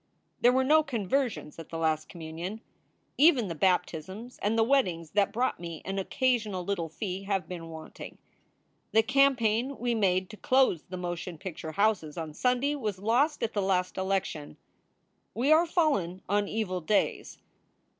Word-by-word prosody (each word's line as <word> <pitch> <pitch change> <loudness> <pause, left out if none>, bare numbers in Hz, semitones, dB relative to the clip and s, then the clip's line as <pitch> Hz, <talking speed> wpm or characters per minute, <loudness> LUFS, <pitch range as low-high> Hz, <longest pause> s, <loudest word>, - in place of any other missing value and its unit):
There 245 - +5
were 260 +1 +2
no 310 +4 +5
conversions 240 - -2
at 165 - -9
the 165 - -5
last 155 -1 0
communion. 170 +5 -6 0.6
Even 275 - +5
the - - -2
baptisms 185 +6 -1
and 215 +3 +1
the 225 - +5
weddings 185 - +1
that 200 -1 +2
brought 250 +3 0
me 170 -2 -7
an 195 +1 -2
occasional 215 -3 0
little 175 -4 -2
fee 190 +2 -5
have 195 -2 -1
been 170 -2 -7
wanting. 160 -1 -10 0.8
The 220 - +5
campaign 255 -1 +2
we 240 0 0
made 185 -4 +1
to 215 - -10
close 260 - +3
the 185 - -7
motion 175 -1 -5
picture 160 -3 -7
houses 200 -7 +1
on 160 -2 -5
Sunday 250 - +1
was 215 -9 -3
lost 245 +10 +1
at 225 - -1
the 205 - 0
last 185 -1 0
election. 190 -5 -2 0.8
We 260 +6 +2
are 325 +2 +6
fallen 205 - 0
on 205 +1 +1
evil 195 -5 -2
days. 205 +6 0
200 Hz, 160 wpm, -29 LUFS, 175-245 Hz, 0.8 s, are